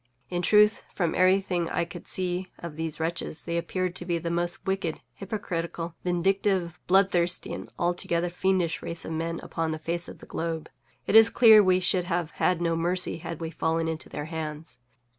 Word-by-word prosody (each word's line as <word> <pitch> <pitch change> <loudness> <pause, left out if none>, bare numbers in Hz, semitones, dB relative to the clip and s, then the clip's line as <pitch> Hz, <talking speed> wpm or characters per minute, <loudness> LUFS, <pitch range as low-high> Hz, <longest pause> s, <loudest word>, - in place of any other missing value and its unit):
In 175 -1 -1
truth, 210 +3 +5
from 175 -4 0
everything 185 -2 +2
I 170 - 0
could 175 0 -10
see 185 0 -1
of 170 -3 -8
these 160 0 -2
wretches, 160 -1 -3
they 170 - -3
appeared 185 +1 -1
to - - +1
be 175 -1 -1
the 170 0 -3
most 175 +2 -2
wicked, 190 -4 -1
hypocritical, 170 -4 -4
vindictive, 180 0 0
bloodthirsty, 180 -2 +2
and - - -7
altogether 175 0 0
fiendish 180 -2 0
race 170 0 -5
of - - -5
men 165 +1 -2
upon 165 -1 -2
the 155 - -2
face 170 +2 -3
of - - -10
the - - -13
globe. 165 -1 -4 0.3
It - - 0
is 225 0 +9
clear 220 -3 +7
we 185 -1 +4
should 180 0 +1
have 175 -3 -1
had 180 -2 +2
no 165 -1 +1
mercy 175 +2 0
had 170 -1 -6
we 165 -1 -4
fallen 165 0 0
into 160 -1 -4
their 145 - -5
hands. 155 -4 -6
175 Hz, 185 wpm, -27 LUFS, 165-185 Hz, 0.3 s, is